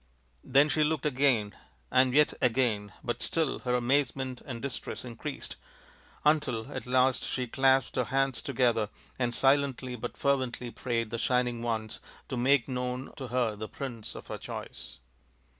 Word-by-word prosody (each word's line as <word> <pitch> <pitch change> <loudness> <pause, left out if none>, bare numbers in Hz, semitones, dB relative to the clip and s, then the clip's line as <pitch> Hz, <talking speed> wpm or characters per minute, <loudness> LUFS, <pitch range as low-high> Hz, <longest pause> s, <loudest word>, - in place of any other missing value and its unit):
" - - -39
Then 140 +3 +5
she 155 +1 +2
looked 150 -1 0
again 130 -7 +2 0.4
and 130 0 +5
yet 150 +3 +4
again, 110 -5 +1
but 120 - -2
still 160 -4 0
her 125 -1 0
amazement 130 0 0
and 120 -4 -5
distress 130 0 -5
increased, 115 -2 -6 0.7
until 150 -7 +2
at - - -5
last 130 0 +3
she 125 - -2
clasped 135 +1 +3
her - - +2
hands 135 -2 +1
together 120 -5 +1 0.3
and 120 -2 0
silently 135 -2 +2
but 120 +1 -6
fervently 130 -3 0
prayed 115 -3 -2
the 115 - -2
Shining 125 -1 +1
Ones 110 -2 -2 0.3
to - - -2
make 125 +1 +3
known 125 0 -3
to 130 - -6
her 120 -3 0
the 110 +1 -6
prince 120 -6 -6
of - - -8
her - - -6
choice. - - -7
125 Hz, 160 wpm, -30 LUFS, 120-135 Hz, 0.7 s, Then